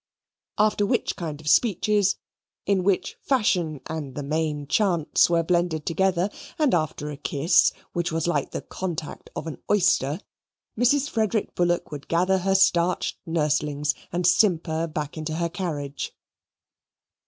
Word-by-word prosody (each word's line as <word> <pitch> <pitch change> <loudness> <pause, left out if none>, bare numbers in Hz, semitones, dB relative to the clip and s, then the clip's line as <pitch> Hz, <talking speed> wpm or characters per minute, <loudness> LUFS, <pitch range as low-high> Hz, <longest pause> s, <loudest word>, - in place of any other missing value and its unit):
After 210 -1 +3
which 200 - 0
kind 155 -4 -5
of 155 - -11
speeches, 205 +1 +3 0.5
in 195 -2 +2
which 185 -1 0
fashion 180 - +1
and 150 -5 -5
the 145 - -4
main 150 0 -1
chance 175 -1 +2
were 170 -1 +2
blended 170 -2 0
together, 185 +2 +1 0.3
and 300 -4 +2
after 155 -3 -1
a 145 - -7
kiss, 150 +5 +3 0.2
which 175 -1 -1
was 165 0 -1
like 175 - 0
the - - -5
contact 170 -5 -5
of - - -4
an 160 - -7
oyster 175 -6 +2 0.6
Mrs. 265 +5 +3
Frederick 220 -3 -1
Bullock 175 -1 0
would 145 -2 -7
gather 185 +3 +2
her 195 +1 +1
starched 180 -2 +2
nurslings 150 -2 0 0.2
and 175 +1 -1
simper 170 -4 +2
back 150 -1 -5
into 155 0 -3
her 170 +1 -1
carriage. 150 -6 -4
170 Hz, 140 wpm, -25 LUFS, 155-190 Hz, 0.6 s, After